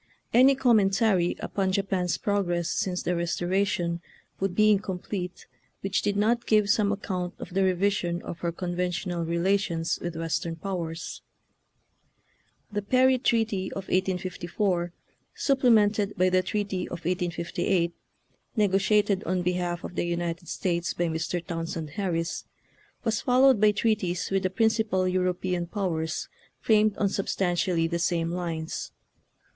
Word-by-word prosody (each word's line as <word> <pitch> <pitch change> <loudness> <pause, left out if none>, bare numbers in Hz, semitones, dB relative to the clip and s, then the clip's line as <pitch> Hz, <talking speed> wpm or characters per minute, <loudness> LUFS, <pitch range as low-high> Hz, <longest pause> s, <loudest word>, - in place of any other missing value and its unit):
Any 260 +3 +7
commentary 205 -7 +3
upon 190 -2 -1
Japan's 190 -3 0
prog 205 -2 0
ress 175 -1 -1
since 180 -2 -1
the - - 0
Eestoration 175 0 0 0.4
would 190 -2 -1
be 215 +1 +5
in 205 - +4
complete 185 -2 -5 0.4
which 195 0 0
did 205 -1 0
not 235 +3 +1
give 210 -2 +4
some 205 -1 +2
ac 205 0 -3
count 180 -3 -3
of - - -9
the 195 +1 +2
revision 185 -2 +1
of 170 - -7
her 170 0 -1
conventional 180 0 -2
relations 170 0 0
with. 175 -1 -4
Western 165 0 -2
powers. 170 -2 -5 1.5
The 205 0 -1
Perry 255 +4 +3
treaty 220 -6 0
of 195 -1 -6
1854, 180 -1 -1 0.4
supplemented 220 -7 +3
by 185 +1 +4
the 185 0 +3
treaty 195 -1 -2
of 170 -2 -7
1858, 175 0 0 0.6
negotiated 205 -1 +2
on 180 +1 0
behalf 175 -1 -1
of - - -6
the - - -1
United 170 0 -3
States 175 -2 -1
by 175 -1 0
Mr. 165 +2 -2
Townsend 165 -2 -4
Harris, 170 -2 -2 0.6
was 225 -2 0
followed 255 -2 +5
by 215 - +7
treaties 200 -5 0
with 195 0 +2
the 185 - 0
principal 220 -2 +1
European 180 -1 0
powers 170 -4 -2 0.3
framed 215 -1 +3
on 205 - +2
substantially 180 -3 0
the 170 +1 -1
same 170 -1 0
lines. 165 -3 -4
185 Hz, 135 wpm, -27 LUFS, 175-205 Hz, 1.5 s, Any